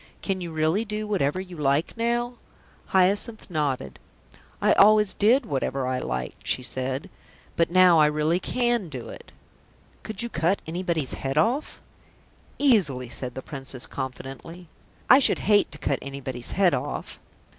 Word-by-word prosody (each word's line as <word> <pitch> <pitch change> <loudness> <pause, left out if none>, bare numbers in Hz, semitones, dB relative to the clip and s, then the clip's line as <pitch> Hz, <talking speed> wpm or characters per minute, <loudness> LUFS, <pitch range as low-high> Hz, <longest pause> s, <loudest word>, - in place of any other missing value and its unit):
"Can 190 -2 -2
you 170 -2 -5
really 160 +6 +1
do 215 -1 -4
whatever 185 -6 0
you 185 -1 -8
like 145 +1 0
now?" 240 +1 0 0.5
Hyacinth 200 +3 +1
nodded. 140 - -2 0.6
"I - - +4
always 210 0 +5
did 240 +6 +3
whatever 135 -5 -2
I 130 0 -1
liked," 65 - -5
she 130 - 0
said, 130 +2 -3 0.5
"But 165 - +2
now 180 -2 +6
I 150 - +6
really 155 +3 +1
can 240 -4 0
do 130 -5 -7
it." - - -11 0.7
"Could 220 0 -4
you - - -2
cut 170 +1 +1
anybody's 165 -4 -2
head 135 +1 -3
off?" 240 - +1 0.8
"Easily," 175 - +2
said 125 0 -5
the 130 - -6
Princess 135 -3 -7
confidently. 135 +6 -7 0.4
"I 260 - +8
should 275 - +2
hate 205 -1 +4
to 145 - -10
cut 140 -2 -1
anybody's 130 -3 -5
head 185 -3 +3
off." - - -4
165 Hz, 150 wpm, -25 LUFS, 135-205 Hz, 0.8 s, I